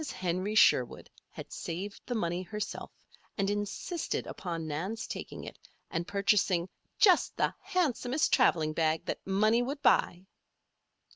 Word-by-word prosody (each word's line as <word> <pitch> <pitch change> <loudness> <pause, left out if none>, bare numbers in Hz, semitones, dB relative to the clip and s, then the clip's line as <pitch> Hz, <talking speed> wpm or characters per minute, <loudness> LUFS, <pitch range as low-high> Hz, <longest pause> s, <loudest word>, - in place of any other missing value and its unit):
Henry 185 +3 -2
Sherwood 125 - +3 0.2
had - - -10
saved 190 +5 -5
the 245 - -2
money 175 -4 -1
herself 210 +4 -5 0.5
and 195 -1 +1
insisted 205 - -3
upon 165 -3 -5
Nan's 190 +9 -3
taking - - -7
it - - -9 0.3
and 170 +1 -2
purchasing 200 -3 +2 0.3
"just 375 -5 +4
the - - +1
handsomest 305 - 0
traveling 155 -2 +3
bag 160 +1 +1
the - - -3
money 215 +4 +3
would 280 +3 -4
buy." 180 -7 +3
195 Hz, 130 wpm, -30 LUFS, 170-225 Hz, 0.5 s, just